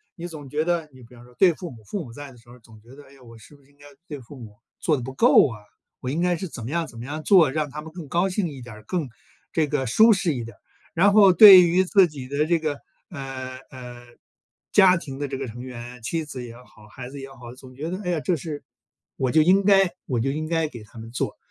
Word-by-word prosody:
你 175 -1 -7
总 150 -5 -10
觉 155 +3 -1
得 170 -3 -1
你 130 -2 -16
比 115 - -17
方 120 0 -15
说 125 0 -19
对 180 -3 +5
父 175 +2 -8
母 115 -6 -14
父 185 - -5
母 120 - -12
在 145 +2 -10
的 125 - -17
时 120 +1 -22
候 125 - -14
总 110 -2 -19
觉 120 +4 -17
得， 145 - -14
哎， 135 -1 -20
我 115 -2 -14
是 125 +6 -17
不 140 - -23
是 135 - -28
应 140 - -31
该 145 - -18 0.2
对 145 -2 -7
父 130 +3 -14
母 110 -5 -12 0.2
做 155 -3 +1
得 125 - -6
不 130 - -7
够 135 - +5
啊， 110 -5 -8 0.4
我 130 - -5
应 150 - -2
该 175 0 +1
是 185 +3 -5
怎 125 - -8
么 125 - -6
样 170 -1 -1
怎 115 - -14
么 115 - -8
样 155 +3 -5
做， 170 -6 +5
让 150 +1 -2
他 150 +2 -8
们 160 0 -12
更 170 -4 -9
高 175 +6 +1
兴 185 0 -2
一 140 -5 -9
点 120 -2 -11
儿， 110 0 -14
更 170 -6 -2 0.4
这 155 -2 0
个 145 -2 -2
舒 220 - +5
适 185 -6 +1
一 120 -3 -4
点 115 -2 -11
儿。 - - -41 0.4
然 195 +4 +4
后 200 -3 +7
对 195 -2 +10
于 175 +2 +3
自 190 0 +4
己 140 -5 -9
的 145 +3 -1
这 170 0 +2
个， 155 -3 -3 0.3
呃， 130 -3 -7
呃， 125 -2 -11 0.6
家 190 -2 +6
庭 135 -5 -8
的 145 - -3
这 135 0 -5
个 - - -5
成 120 +2 -9
员， 125 -1 -9
妻 160 +8 -3
子 130 -4 -8
也 115 -1 -10
好、 110 -3 -18
孩 125 +4 -10
子 140 - -9
也 135 - -9
好， 120 -3 -12
总 130 0 -15
觉 155 +5 -5
得 185 +2 -5
哎 180 - -4
呀， 170 - 0
这 175 - 0
是 150 -1 -7 0.5
我 130 - 0
就 155 0 +4
应 190 +4 +4
该 195 -1 +5 0.2
我 125 -3 -1
就 135 +4 0
应 155 +2 -4
该 165 -1 0
给 120 -6 -11
他 105 - -17
们 115 +1 -10
做。 125 - -3
140 Hz, 300 characters per minute, -23 LUFS, 125-170 Hz, 0.6 s, 对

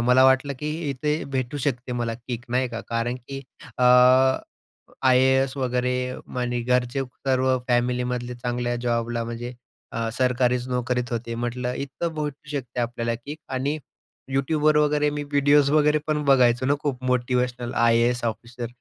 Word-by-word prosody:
मला 125 +2 +5
वाटलं, 130 +2 +4
की 150 +2 -3 0.2
इथे 150 +3 -1
भेटू 130 +1 -1
शकते 125 -2 -2
मला 120 -2 -2
किक 120 +1 -7
नाही 125 +1 +1
का 115 -2 -5
कारण 115 +1 -1
की 135 +2 -8 0.4
अ, - - +1 1.2
आय-ए-एस 130 +1 +4
वगैरे 125 -1 0 0.5
आणि 125 0 -1
घरचे 125 +2 +1 0.2
सर्व 130 0 +3
फॅमिलीमधले 125 0 0
चांगल्या 120 0 -2
जॉबला 120 0 0
म्हणजे 120 +1 -5 0.4
अ, 115 0 -2
सरकारीच 125 -1 +1
नोकरीत 125 -1 -1
होते. 115 0 -3
म्हटलं 120 +1 -3
इथं 140 +5 -4
भेटू 150 -1 -5
शकते 130 -4 -4
आपल्याला 115 -1 -1
किक 140 +7 -8
आणि 135 +3 -1 0.5
YouTubeवर 150 +3 +2
वगैरे 150 0 +2
मी 145 0 -3
व्हिडिओज 145 0 +4
वगैरे 150 0 +4
पण 155 -1 0
बघायचो 130 -2 +4
ना, 140 - +3
खूप 135 -4 -3
मोटिवेशनल. 125 -1 0
IAS 115 +1 +3
officer. 120 +2 -4
125 Hz, 145 wpm, -24 LUFS, 120-135 Hz, 1.2 s, मला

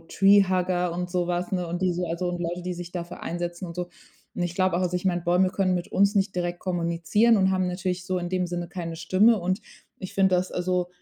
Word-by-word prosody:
Treehugger 185 -1 +3
und 180 +1 -3
so 175 -1 -1
was, 175 +1 -2
ne, 180 -2 -1
und 175 +2 -3
die 185 -1 +2
so 175 +1 -2
also 175 +2 -2
und 175 0 -3
Leute, 175 +1 -3
die 180 0 -3
sich 175 0 -7
dafür 175 -1 -6
einsetzen 175 +1 -4
und 170 - -9
so. 175 0 -3 0.5
Und 180 - -2
ich 175 0 -3
glaube 185 -2 +2
auch, - - 0
also 180 0 0
ich 180 - -5
meine, 175 -2 +1
Bäume 180 +2 +3
können 185 -1 +1
mit 175 - -4
uns 200 +2 +3
nicht 195 -1 +1
direkt 175 0 -2
kommunizieren 175 +6 +2
und 190 -1 +3
haben 185 -1 +1
natürlich 180 0 -3
so 185 -1 -1
in 175 0 -4
dem 180 -1 -1
Sinne 175 0 -3
keine 170 -2 -5
Stimme. 195 +7 +4
Und 185 +4 -1 0.4
ich 190 - -7
finde, 190 -1 +3
dass 180 +1 0
also 180 0 -1
180 Hz, 245 wpm, -26 LUFS, 175-185 Hz, 0.5 s, Stimme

